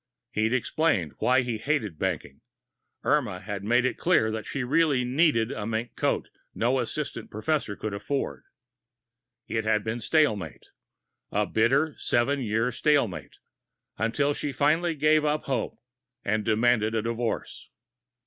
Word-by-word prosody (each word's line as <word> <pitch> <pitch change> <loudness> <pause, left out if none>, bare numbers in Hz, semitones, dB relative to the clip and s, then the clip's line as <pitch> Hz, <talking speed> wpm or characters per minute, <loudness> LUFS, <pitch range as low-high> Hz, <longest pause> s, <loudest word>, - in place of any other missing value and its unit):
He'd 110 -1 +1
explained 125 - +1
why 130 +1 +4
he 120 -3 -3
hated 110 - -1
banking; 70 - -3 0.6
Irma 125 -11 +1
had 100 0 -5
made 120 +4 +3
it 130 - -1
clear 140 -11 +3
that 110 0 -5
she 135 - -3
really 140 0 +2
needed 125 -4 +2
the 120 -6 -4
mink 115 +2 -3
coat - - 0 0.3
no 125 +4 +1
assistant 120 -1 -3
professor 110 0 -1
could 110 0 -4
afford. 120 +8 -3 1.0
It 110 -1 -1
had 110 -1 +1
been 110 +1 -3
stalemate 110 - +1 0.7
a - - +1
bitter, 135 +8 +2
seven 135 +4 +1
year 115 +1 0
stalemate, 130 - 0 0.6
until 140 +6 +1
she 145 - -3
finally 160 +5 +2
gave 155 +1 +3
up 150 0 0
hope 135 -2 -2 0.5
and 110 +1 +1
demanded 110 0 +2
a 110 - 0
divorce. 115 0 -3
120 Hz, 140 wpm, -27 LUFS, 110-145 Hz, 1.0 s, why